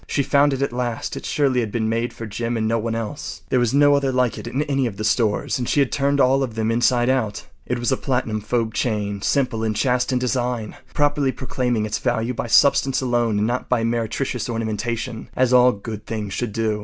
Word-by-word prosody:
She 140 - 0
found 145 +1 +3
it 135 0 -1
at 140 - -2
last. 120 -2 -3
It - - -6
surely 135 -4 +1
had 115 -3 -2
been 110 -1 -1
made 115 +2 -1
for 115 - -8
Jim 115 +2 -3
and 110 -1 0
no 115 +1 +1
one 115 +1 -2
else. 115 +6 -5
There 130 - +2
was 120 -2 +2
no 145 +1 +5
other 140 -1 +2
like 125 -2 +1
it - - -8
in 130 +5 -1
any 135 -3 0
of 100 -4 -7
the 110 - -4
stores, 110 +2 +1
and 120 - -2
she - - +2
had 135 -3 +2
turned 140 +1 +1
all 135 +1 +4
of 120 -5 -3
them 110 0 0
inside 120 +1 +2
out. 125 -6 0 0.2
It 125 - -1
was 120 +2 -1
a 130 - +2
platinum 125 -5 -1
fob 115 +1 -1
chain 105 -4 -1
simple 125 -3 0
and 110 -1 -1
chaste 125 +2 +1
in 130 - +1
design, 125 -3 -2 0.2
properly 145 -2 +2
proclaiming 125 -4 -1
its 110 - -2
value 120 -1 -1
by 120 - -4
substance 135 +2 +4
alone 120 -4 +1
and 105 - +1
not 120 +3 -2
by 125 -2 +2
meretricious 120 +2 -2
ornamentation—as 115 +2 -2
all 125 0 +7
good 105 0 -8
things 105 -3 -4
should 120 -3 -2
do. 110 -1 -1
120 Hz, 230 wpm, -22 LUFS, 110-130 Hz, 0.2 s, all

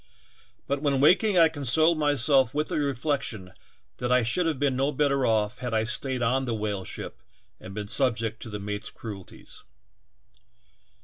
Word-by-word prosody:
But 140 +1 -2
when 140 -3 +1
waking 185 +7 +4
I 165 -1 +7
consoled 155 +2 +2
myself 140 -3 +2
with 150 +1 -1
the - - -1
reflection 130 -9 -2 0.5
that 125 0 -2
I 125 -1 +4
should 165 +10 +1
have 160 -4 -1
been 140 -1 +1
no 135 +3 +1
better 140 -2 +1
off 110 0 0
had 125 -2 -3
I 110 - +2
staid 130 +1 -2
on 130 +3 +1
the 120 -2 -2
whale 105 -3 -3
ship - - -7 0.4
and 95 +1 -10
been 105 -1 -4
subject 115 -3 -1
to 115 - -7
the 105 -1 -5
mate's 105 +1 -5
cruel 105 -4 -8
ties. - - -14
130 Hz, 175 wpm, -26 LUFS, 110-145 Hz, 0.5 s, I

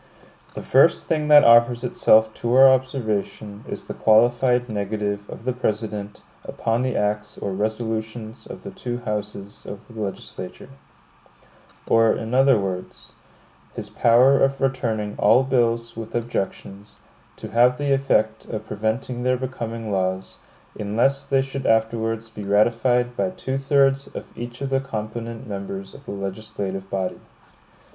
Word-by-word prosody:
The - - -6
first 140 +6 +4
thing 155 -2 -1
that 150 -1 +8
offers 120 +1 +5
itself 110 -3 +3
to 120 +1 +1
our 135 +1 +9
observation, 110 -5 -1
is - - -5
the - - -7
qualified 120 +3 +3
negative 105 -1 -3
of 115 - -10
the 130 - 0
President 105 -3 -3 0.2
upon 115 +1 -1
the 130 -1 -1
acts 105 0 -2
or 100 - -4
resolutions 110 +2 -4
of - - -10
the 195 - -7
two 125 -11 -5
houses 105 -2 -5
of 100 - -9
the 115 -2 -8
legislature; 100 -2 -7 1.2
or, 115 -1 +4
in 115 +2 -5
other 135 -1 +5
words, 95 -2 -6 0.6
his - - -7
power 125 +4 +5
of 135 0 +1
returning 115 -6 -1
all 125 +3 +5
bills 115 -3 0
with 115 -1 -7
objections, 105 -3 -4 0.4
to - - -9
have 125 +2 +4
the 140 0 +1
effect 110 -5 +1
of 110 - -6
preventing 110 +4 -3
their 125 +1 +1
becoming 115 -3 -5
laws, 95 -1 -2 0.4
unless 120 +7 +1
they 135 -1 +1
should 135 0 -5
afterwards 115 0 0
be 105 -2 -9
ratified 120 +4 +2
by 185 - 0
two 135 -7 -4
thirds 135 0 +2
of - - -8
each 120 +1 -8
of 135 -1 -3
the 135 - +2
component 115 -1 -6
members 100 -1 -6
of 140 - -14
the - - -6
legislative 95 -1 -5
body. 95 -1 -3
115 Hz, 145 wpm, -23 LUFS, 105-130 Hz, 1.2 s, our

